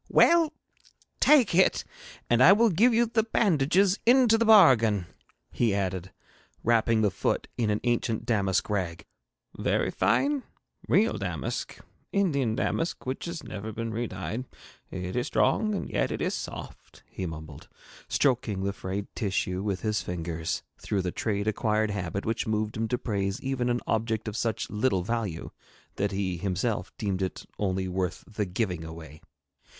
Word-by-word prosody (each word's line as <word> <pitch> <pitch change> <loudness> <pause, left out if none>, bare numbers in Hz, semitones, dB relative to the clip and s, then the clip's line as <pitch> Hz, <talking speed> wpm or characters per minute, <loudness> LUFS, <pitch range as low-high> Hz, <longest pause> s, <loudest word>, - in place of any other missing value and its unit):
'Well, 335 -2 +5 0.7
take 280 -10 +5
it, 185 +2 +4 0.4
and 120 +1 +3
I 175 +9 +9
will 225 +1 +4
give 220 +9 +4
you 235 +1 +3
the 225 0 +1
bandages 195 -3 +2
into 245 -1 +5
the 230 +1 +2
bargain,' 125 - +6 0.5
he 115 -5 +1
added, 95 -1 -2 0.5
wrapping 115 -1 +3
the 105 -2 +2
foot - - -1
in 115 -3 0
an 105 0 +1
ancient 120 -2 0
damask 100 -5 +1
rag. 95 -5 -2 0.5
'Very - - +1
fine? 285 0 +2 0.5
Real - - +3
damask - - -4 0.3
Indian 140 - +1
damask 165 +8 -2
which 130 +1 -3
has 170 -1 -5
never 105 +2 -6
been 115 +1 -4
redyed. 115 +1 -4 0.4
It 90 +1 -5
is 125 +3 0
strong, 215 +5 +2
and - - -3
yet - - -1
it - - -3
is - - -1
soft,' - - -8
he 95 - -5
mumbled, 80 -3 -9 0.4
stroking 120 -8 +1
the 100 0 -1
frayed 100 +1 -4
tissue 95 -3 -1
with 100 -3 -2
his 105 -1 0
fingers, 85 -2 -3 0.2
through 100 -3 -1
the 90 - -2
trade 100 0 -2
acquired 110 0 +1
habit 100 -1 -3
which 115 0 -1
moved 110 0 -1
him 115 +1 -1
to 125 - 0
praise 100 -4 -2
even 130 -2 -1
an 120 0 0
object 110 0 -1
of 105 - -4
such 115 -2 -1
little 105 -3 +1
value 105 -5 -3 0.5
that 100 0 0
he 95 -2 -2
himself 95 +2 -2
deemed 100 -3 -2
it 95 - -3
only 95 -2 -1
worth 90 -1 -2
the 105 -1 -2
giving 90 -3 -2
away. 80 -2 -10
110 Hz, 155 wpm, -27 LUFS, 95-130 Hz, 0.7 s, I